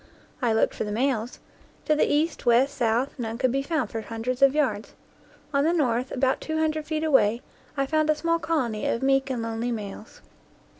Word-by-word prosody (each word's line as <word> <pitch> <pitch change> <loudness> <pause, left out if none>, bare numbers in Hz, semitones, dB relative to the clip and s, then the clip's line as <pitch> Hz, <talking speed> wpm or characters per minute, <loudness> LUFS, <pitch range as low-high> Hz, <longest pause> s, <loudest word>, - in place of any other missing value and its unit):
I 240 -3 +2
looked 220 - +2
for - - -3
the 210 - -4
males; 240 0 -1 0.5
to 305 - +3
the 305 - +2
east, 300 -2 0
west, 260 +4 +4
south, 240 +1 +1
none 225 -1 -3
could 255 -1 +1
be 275 +2 0
found 275 -5 -2
for 225 - -3
hundreds 230 +4 -4
of 275 +1 +5
yards. 230 -8 -1 0.6
On 280 0 +3
the 330 +3 +2
north, 255 -5 0
about 260 0 0
two 315 0 -3
hundred 310 -1 -1
feet 310 0 -2
away, 240 -7 +3 0.3
I 275 - +1
found 310 +2 +1
a 310 - +4
small 335 +2 0
colony 285 -10 -1
of 235 - -1
meek 270 0 +2
and 245 -3 -2
lonely 230 +1 -2
males. 210 -1 -7
265 Hz, 200 wpm, -25 LUFS, 230-300 Hz, 0.6 s, of